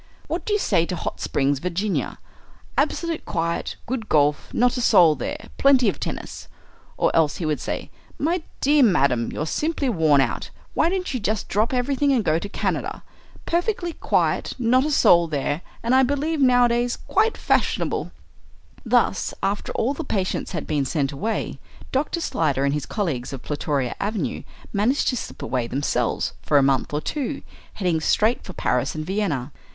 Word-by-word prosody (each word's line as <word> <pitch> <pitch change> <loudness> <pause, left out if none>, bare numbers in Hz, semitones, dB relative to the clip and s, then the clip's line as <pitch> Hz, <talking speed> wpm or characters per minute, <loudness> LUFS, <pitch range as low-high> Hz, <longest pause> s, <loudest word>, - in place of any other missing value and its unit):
"What - - -4
do 420 - 0
you - - +4
say 175 - +1
to 180 - -3
Hot - - -4
Springs, 140 0 +1
Virginia? 180 +5 -2 0.6
absolute 335 -2 0
quiet, 170 0 -2
good 230 -3 -4
golf, 145 -1 +2
not 245 +1 +2
a 250 - -2
soul 180 -9 +6
there, - - -5
plenty 270 -3 +5
of - - -5
tennis." - - -6 0.5
Or - - +1
else 155 -2 +3
he 170 - -3
would 155 -1 0
say, - - -4 0.3
"My 335 +4 0 0.2
dear 290 +1 +4
madam, 140 - +3
you're 150 - -3
simply 300 - -1
worn 160 - +3
out. 135 - -1 0.2
Why 330 - +3
don't 365 -4 -2
you 255 - -1
just 215 0 -1
drop 215 +3 +1
everything 270 +2 +1
and 250 -5 +2
go 160 -3 +2
to 200 - -6
Canada? - - -2 0.4
perfectly 345 0 -1
quiet, - - 0
not 255 +2 +3
a - - 0
soul 170 - +5
there, 145 +1 -2 0.2
and, 235 +2 +1
I 260 - +6
believe, 285 +4 0
nowadays 245 -1 +3
quite 445 +1 +2
fashionable." - - 0 0.7
Thus, 235 -5 +1
after 200 +1 -1
all 255 +5 0
the 325 - -5
patients 190 -8 -2
had 165 - -3
been 145 -2 0
sent 140 0 -1
away, 215 +11 -3 0.3
Dr. 295 +5 0
Slyder 140 - 0
and 140 - +1
his 145 -1 -3
colleagues 150 - -2
of 135 - -7
Plutoria 145 -3 -2
Avenue 205 +1 -2 0.3
managed 220 +8 +2
to 255 - 0
slip - - -6
away 125 -2 -1
themselves 140 +4 -1
for 145 - +2
a 140 - +5
month 135 -1 +1
or 150 +1 -1
two, 285 - -3 0.3
heading 175 -5 0
straight 220 +8 +2
for 185 - -9
Paris 125 -1 0
and 155 0 -4
Vienna. 165 -9 -1
205 Hz, 175 wpm, -23 LUFS, -, 0.7 s, soul